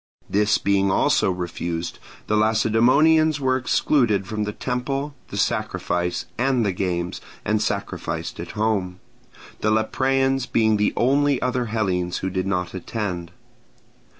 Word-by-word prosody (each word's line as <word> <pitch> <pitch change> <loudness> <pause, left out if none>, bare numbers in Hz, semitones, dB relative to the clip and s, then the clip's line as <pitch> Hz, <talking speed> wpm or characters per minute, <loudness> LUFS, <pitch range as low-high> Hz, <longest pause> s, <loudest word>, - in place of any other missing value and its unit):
This 105 0 +2
being 100 -1 +2
also 95 - +3
refused, 85 -2 -4 0.3
the 105 - 0
Lacedaemonians 125 +9 +4
were 130 -2 +2
excluded 125 -5 +2
from 105 +2 -3
the 105 - -3
temple, 135 +5 -3
the 100 - -7
sacrifice, 95 -5 -1
and 125 -2 +2
the 100 - +1
games, 90 -1 -2 0.2
and 105 0 +1
sacrificed 100 -2 -3
at - - -6
home; 100 -4 0 0.6
the 110 - +1
Lepreans 135 +4 +1
being 110 -1 +3
the 105 0 +2
only 140 +2 +3
other 125 -1 -1
Hellenes 95 -5 -1
who 95 - -3
did 95 0 -2
not 90 -3 -1
attend. 90 -3 -4
110 Hz, 130 wpm, -23 LUFS, 95-125 Hz, 0.6 s, Lacedaemonians